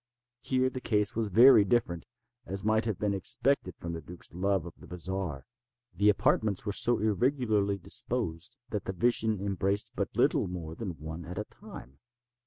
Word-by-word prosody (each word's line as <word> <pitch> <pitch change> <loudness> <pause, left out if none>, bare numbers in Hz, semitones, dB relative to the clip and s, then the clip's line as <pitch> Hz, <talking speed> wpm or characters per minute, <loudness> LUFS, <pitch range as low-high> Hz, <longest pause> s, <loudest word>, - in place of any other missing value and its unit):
Here 130 -1 +1
the 130 - -6
case 105 -4 +1
was 115 -1 0
very 115 +3 +7
different; 100 -6 0 0.4
as 95 0 -5
might 110 +1 +2
have 110 -5 -1
been 105 -1 0
expected 100 +2 0
from 85 0 -5
the 80 - -5
duke's 85 +2 -11
love 95 0 0
of 85 - -8
the - - -13
bizarre. 90 -5 -4 0.5
The 100 +4 +3
apartments 105 -1 +2
were 105 - -1
so 120 +3 +3
irregularly 110 -2 +1
disposed 85 +4 -2
that 105 - -3
the 95 - -3
vision 110 0 +1
embraced 100 +1 -1
but - - -1
little - - +3
more 85 -3 -6
than 90 -3 -6
one 80 +3 -7
at 90 +3 -8
a 105 - -1
time. 70 -9 -13
100 Hz, 175 wpm, -30 LUFS, 90-110 Hz, 0.5 s, very